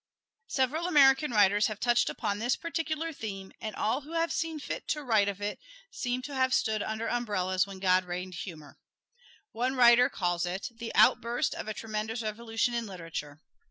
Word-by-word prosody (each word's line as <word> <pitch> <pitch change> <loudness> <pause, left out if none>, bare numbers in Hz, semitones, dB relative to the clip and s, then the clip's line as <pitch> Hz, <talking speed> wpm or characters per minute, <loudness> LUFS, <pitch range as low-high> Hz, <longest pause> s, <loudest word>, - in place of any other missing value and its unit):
Several 285 +6 0
American 280 -3 +5
writers 205 -2 +4
have 215 -1 -6
touched 240 -1 +2
upon 205 0 -2
this 240 +3 +1
particular 325 -1 -3
theme, 195 -6 -6
and 215 -2 -5
all 245 +6 0
who 300 +4 -11
have 335 0 0
seen 325 -2 -2
fit - - -6
to 300 -1 -2
write 220 -6 +3
of 200 0 -6
it 205 - -3 0.3
seem 250 - -3
to 285 - -6
have 260 0 +2
stood 220 -4 +1
under 220 +2 -3
umbrellas 195 -6 0
when 195 -1 -8
God 185 -1 +3
rained 180 +1 -5
humor. 160 -5 -9 0.7
One 250 +3 -1
writer 245 0 +6
calls 175 -2 -1
it 185 +3 -4
"the 230 0 -6
outburst 235 +1 +3
of - - -6
a 215 - -2
tremendous 225 +1 -4
revolution 225 +2 -1
in 235 -1 -2
literature." 165 -5 -7
225 Hz, 180 wpm, -29 LUFS, 195-260 Hz, 0.7 s, writer